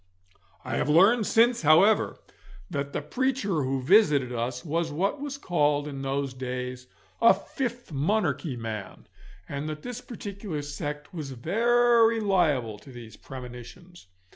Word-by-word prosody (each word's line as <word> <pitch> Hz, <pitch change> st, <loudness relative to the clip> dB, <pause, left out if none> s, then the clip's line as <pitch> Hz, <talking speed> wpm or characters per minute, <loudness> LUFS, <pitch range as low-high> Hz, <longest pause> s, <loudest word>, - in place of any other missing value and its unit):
I -, -, -2 dB
have -, -, 0 dB
learned 200 Hz, +8 st, +5 dB
since, 235 Hz, +1 st, +3 dB
however, 165 Hz, +8 st, +4 dB, 0.5 s
that 140 Hz, 0 st, -3 dB
the -, -, -3 dB
preacher 220 Hz, -, -1 dB
who 130 Hz, 0 st, -2 dB
visited 145 Hz, -, +4 dB
us 120 Hz, +3 st, -3 dB
was 165 Hz, +1 st, -1 dB
what 195 Hz, -, -1 dB
was 285 Hz, -1 st, -4 dB
called 150 Hz, -, +1 dB
in 140 Hz, -2 st, -6 dB
those 135 Hz, 0 st, -2 dB
days 125 Hz, 0 st, -5 dB, 0.3 s
a 230 Hz, -, +7 dB
fifth 245 Hz, -6 st, -5 dB
monarchy 150 Hz, -2 st, 0 dB
man, 110 Hz, -4 st, -6 dB, 0.4 s
and 145 Hz, +2 st, -4 dB
that 155 Hz, 0 st, -6 dB
this 245 Hz, 0 st, -6 dB
particular 200 Hz, -9 st, -6 dB
sect 145 Hz, +3 st, -6 dB
was 150 Hz, -6 st, -6 dB
very 230 Hz, -, +3 dB
liable 150 Hz, -, +1 dB
to 135 Hz, -, -14 dB
these 115 Hz, -3 st, -11 dB
premonitions. 125 Hz, -, -11 dB
150 Hz, 140 wpm, -27 LUFS, 130-210 Hz, 0.5 s, a